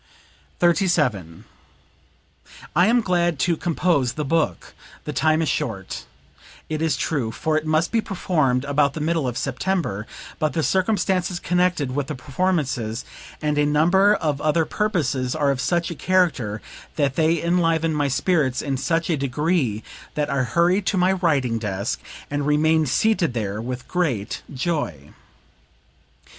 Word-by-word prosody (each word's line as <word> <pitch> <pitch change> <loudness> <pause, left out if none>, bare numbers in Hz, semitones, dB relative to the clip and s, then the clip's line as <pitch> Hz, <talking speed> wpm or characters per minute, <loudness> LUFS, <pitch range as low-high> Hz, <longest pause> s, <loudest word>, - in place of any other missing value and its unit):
37. 150 - +1 1.3
"I 175 +4 +5
am 240 +2 +4
glad 175 -5 +1
to 170 +6 +1
compose 160 -6 +1
the 150 +2 -3
book. 150 - -1 0.3
The 150 - -5
time 155 +4 +2
is - - -1
short, 95 - -3 0.6
it 155 0 -2
is 160 -1 +1
true, 135 -8 -1
for 155 +6 -1
it 155 0 -1
must 155 +1 +1
be 230 - +2
performed 155 - 0
about 140 0 +1
the - - -3
middle 160 -2 0
of 120 -1 -3
September; 135 - -2 0.3
but 155 -1 0
the 160 - 0
circumstances 185 -2 +1
connected 180 -6 +1
with 145 -2 -1
the 150 - -4
performances, 130 -5 -1 0.4
and 150 -1 +1
a 145 - +3
number 180 +8 +4
of 150 -6 -1
other 155 +1 +2
purposes, 155 - -1
are 145 -3 +2
of 130 -2 -2
such 170 +2 0
a - - -5
character 155 - +1 0.3
that 140 -3 0
they 165 0 +2
enliven 165 -1 +1
my 145 -1 +1
spirits 135 -2 +1
in 140 -2 -1
such 165 +5 0
a 170 - +1
degree 140 - 0 0.3
that 150 -1 -1
I 140 - +1
hurry 170 - +2
to 195 0 -1
my 185 +1 +3
writing 140 -11 +1
desk 100 -1 -3 0.3
and 145 0 -1
remain 155 +1 +3
seated 170 - +1
there 105 -2 -2
with 125 +1 -5
great 135 - -1
joy." 130 - -3
155 Hz, 150 wpm, -23 LUFS, 130-175 Hz, 1.3 s, I